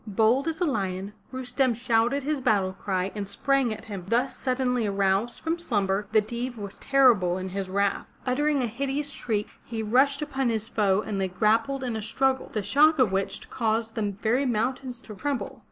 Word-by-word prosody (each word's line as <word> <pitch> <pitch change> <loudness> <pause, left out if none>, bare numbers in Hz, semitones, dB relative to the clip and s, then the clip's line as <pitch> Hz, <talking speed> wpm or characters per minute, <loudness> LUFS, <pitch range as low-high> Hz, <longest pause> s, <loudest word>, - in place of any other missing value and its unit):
Bold 225 +8 +2
as 325 +1 -2
a 355 - +2
lion, 195 - -2 0.2
Rustem 260 -1 0
shouted 240 +3 +1
his 295 -1 -1
battle 200 -6 +2
cry 190 0 -2
and 205 -2 -4
sprang 270 +4 +1
at 215 - -6
him. 195 -5 -6
Thus 240 +5 +1
suddenly 250 -3 0
aroused 200 +3 +1
from 330 +1 -1
slumber, 205 - 0
the 215 - +5
Deev 240 +3 -4
was 200 -2 -7
terrible 235 -10 +4
in 185 0 -4
his 190 0 -4
wrath. 200 +1 0 0.2
Uttering 285 +2 +1
a - - +2
hideous 275 +5 -2
shriek, 215 -6 -2
he 225 -2 -4
rushed 275 +6 +3
upon 270 -4 -1
his 220 -1 -1
foe 205 -2 +2
and 200 -3 -2
they 190 - +1
grappled 225 +8 +1
in 245 -3 -2
a 220 - -3
struggle, 265 +5 0
the 215 - -2
shock 305 +7 +4
of 250 -7 +3
which 195 0 -2
caused 225 -1 0
the 225 - -3
very 235 +7 +1
mountains 250 +2 -2
to 215 - -9
tremble. 280 +5 -3
230 Hz, 190 wpm, -26 LUFS, 205-265 Hz, 0.2 s, the